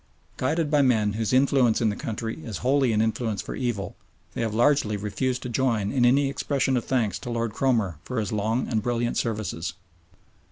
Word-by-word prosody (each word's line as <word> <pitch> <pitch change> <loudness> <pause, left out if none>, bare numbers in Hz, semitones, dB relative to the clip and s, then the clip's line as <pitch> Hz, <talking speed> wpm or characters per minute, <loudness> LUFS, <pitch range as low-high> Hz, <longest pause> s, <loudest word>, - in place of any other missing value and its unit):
Guided 155 +3 0
by 150 -2 +4
men 110 -6 +2
whose 110 -1 -1
influence 130 -3 +3
in 115 - +2
the 105 - -2
country 115 +5 -4
is 110 -4 -5
wholly 135 -2 +3
an 110 0 +2
influence 110 -2 -1
for 105 - -5
evil, 120 -6 -3 0.4
they - - -3
have 115 -2 0
largely 115 -2 +2
refused 125 +5 -2
to - - -4
join 115 -5 0
in 130 -3 +2
any 135 +3 +4
expression 135 -1 0
of 120 - -1
thanks 120 -6 0
to - - -7
Lord 115 -2 -2
Cromer 110 - 0
for 125 -2 -3
his 105 -3 -2
long 110 +4 0
and 110 -3 0
brilliant 120 +1 -1
services. 110 -7 -2
115 Hz, 195 wpm, -25 LUFS, 110-130 Hz, 0.4 s, by